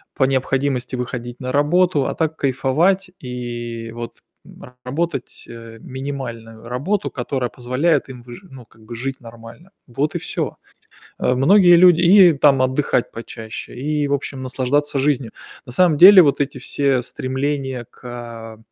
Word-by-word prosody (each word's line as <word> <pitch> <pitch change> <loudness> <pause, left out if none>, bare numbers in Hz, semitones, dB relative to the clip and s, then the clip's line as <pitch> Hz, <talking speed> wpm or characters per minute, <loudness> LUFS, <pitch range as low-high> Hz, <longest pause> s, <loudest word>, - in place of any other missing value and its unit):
По 135 - +2
необходимости 130 -1 -1
выходить 120 -1 -6
на 130 -1 -4
работу. 150 0 +2
А - - -2
так, 160 -1 -1
кайфовать 160 +9 +1
и 120 -2 -6
вот, 120 0 -8 0.2
м, 125 - -15
работать, 140 +1 -4
э, 115 -1 -11
минимальную 125 -5 -7
работу, 165 +12 -2
которая 125 -1 -3
позволяет 135 +4 0
им 125 -2 -10
выжи 125 +10 -12
ну, 130 -4 -13
как 110 0 -24
бы 120 +1 -8
жить 135 +2 -5
нормально. 115 +8 -13 0.2
Вот 140 +5 -3
и - - -1
всё. - - -4 0.6
Э, - - +1
многие 175 +6 +6
люди 175 -1 +6
и 180 0 +7
там 140 -2 +4
отдыхать 130 -1 0
почаще, 115 -1 -8
и, 145 +3 -2
в 140 - -1
общем, 140 -1 -4
наслаждаться 135 +3 -1
жизнью. 135 -4 -1 0.3
На 125 - -7
самом 175 -2 +3
деле 190 +4 +10
вот 145 -5 +2
эти 140 -2 -2
все 135 -1 0
стремления 130 0 -3
к, - - -23
а 115 -2 -8
130 Hz, 155 wpm, -20 LUFS, 120-145 Hz, 0.6 s, деле